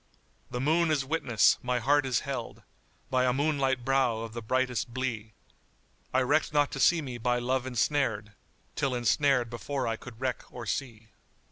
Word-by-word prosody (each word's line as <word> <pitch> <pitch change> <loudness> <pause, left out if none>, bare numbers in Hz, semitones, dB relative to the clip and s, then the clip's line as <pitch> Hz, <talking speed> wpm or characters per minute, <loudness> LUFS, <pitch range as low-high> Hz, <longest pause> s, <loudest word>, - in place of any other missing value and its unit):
The 125 - -4
moon 160 +5 +2
is 145 -3 +1
witness 135 -6 +3
my 125 0 0
heart 140 +3 +2
is 125 -3 +1
held - - -5 0.2
* - - -37
By 130 -1 +3
a 125 - +3
moonlight 135 -3 0
brow 130 -4 +2
of 115 -1 -7
the 120 - -5
brightest 125 +1 -1
blee: 115 -4 -4 0.8
I 130 - +2
reckt 145 +5 +2
not 145 -1 +2
to - - -5
see 165 +4 +4
me 125 -3 -6
by 120 +1 +1
Love 130 +1 -1
ensnared 120 -4 0 0.2
* - - -38
Till 135 -2 0
ensnared 125 0 +2
before 135 +3 -3
I 115 0 -1
could 115 -2 -12
reck 130 -2 -2
or 120 -1 -7
see." 115 -1 -4
130 Hz, 180 wpm, -29 LUFS, 120-140 Hz, 0.8 s, see